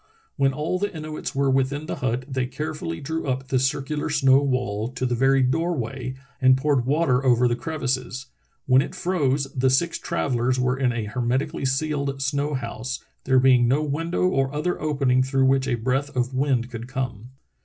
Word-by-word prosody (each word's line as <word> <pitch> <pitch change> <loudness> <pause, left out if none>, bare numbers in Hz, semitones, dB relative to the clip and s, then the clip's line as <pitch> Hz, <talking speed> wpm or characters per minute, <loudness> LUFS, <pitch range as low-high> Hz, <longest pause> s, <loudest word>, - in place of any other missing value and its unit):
When 135 -1 +2
all 155 +7 -2
the 205 +1 -1
Inuits 155 -3 -6
were 135 0 +2
within 135 +3 0
the - - -4
hut 125 0 -2
they 130 -2 -2
carefully 130 - -4
drew 160 +2 -3
up 130 0 -2
the 130 - +2
circular 140 +4 -1
snow 135 -2 +4
wall 125 -6 -1
to 130 - -2
the 125 - 0
very 135 +2 +3
door 165 +7 +1
way 130 +2 -4 0.3
and 130 0 +6
poured 135 -3 +1
water 140 -3 +2
over 125 -1 +4
the 120 - +1
crevices. 130 -3 -3 0.4
When 130 0 +5
it 185 - -5
froze 155 -7 0
the 130 -1 +2
six 170 +6 +1
travellers 130 -6 0
were 125 0 +1
in 130 -2 +1
a 115 -2 -3
hermetically 125 +6 -1
sealed 140 0 -1
snow 140 +2 -1
house, 125 +1 -5 0.2
there 130 0 +3
being 125 -2 +5
no 140 +5 +2
window 165 +5 0
or 135 -6 +1
other 150 +5 -2
opening 135 -4 +2
through 135 0 +2
which 135 0 +2
a - - +1
breath 130 +5 -1
of 125 +1 0
wind 130 -2 0
could 115 0 -6
come. 125 -4 -4
135 Hz, 185 wpm, -24 LUFS, 125-145 Hz, 0.4 s, and